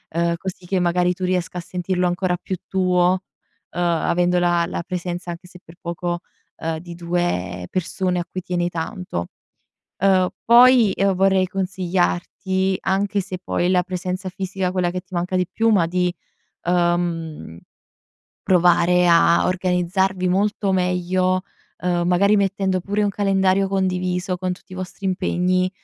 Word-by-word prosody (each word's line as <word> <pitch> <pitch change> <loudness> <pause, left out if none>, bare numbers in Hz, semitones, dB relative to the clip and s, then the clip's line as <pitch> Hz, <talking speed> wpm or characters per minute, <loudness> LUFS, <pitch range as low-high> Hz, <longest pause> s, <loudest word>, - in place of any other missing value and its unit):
uhm, 170 0 +1
così 185 +1 -7
che 190 +1 +1
magari 180 0 +2
tu 185 +1 -8
riesca 180 -1 -1
a - - -3
sentirlo 180 +1 -2
ancora 180 0 0
più 190 - -3
tuo, 185 0 +2 0.5
uhm, 175 - -3
avendo 175 +1 +1
la 175 -1 +2
la - - -4
presenza, 175 -1 -4
anche 170 +1 -9
se 180 0 -14
per 165 - -15
poco, 175 0 -3 0.4
uhm, 165 0 -3
di 170 +1 -9
2 170 - -2
persone 185 0 -1
a 175 - -3
cui 185 - -5
tieni 175 -1 -1
tanto. 170 - -4 0.7
Uhm, 185 -1 +3
poi, 240 -2 +7
uhm, 195 0 +3
vorrei 190 0 +3
consigliarti, 190 0 -1
anche 200 +1 0
se 185 -1 -6
poi 175 - -1
è - - +2
la 180 -1 +3
presenza 185 +1 -4
fisica, 190 0 -3
quella 180 -1 0
che 180 +1 -4
ti 185 +1 -20
manca 180 +1 -1
di 180 -1 +1
più, 225 +3 +2
ma 195 -6 +4
di, 180 +1 0 0.5
uhm, 175 - -1 0.9
provare 180 0 +4
a 170 0 +5
organizzarvi 185 +1 0
molto 200 +1 +1
meglio, 185 0 +1 0.4
uhm, 175 -1 0
magari 200 +4 +4
mettendo 195 -1 0
pure 200 +3 -2
un 205 - +2
calendario 195 -1 +2
condiviso 185 -1 -1
con 185 0 -2
tutti 185 - -14
i - - -7
vostri 185 +2 -7
impegni, 185 0 +1
180 Hz, 155 wpm, -21 LUFS, 175-190 Hz, 0.9 s, poi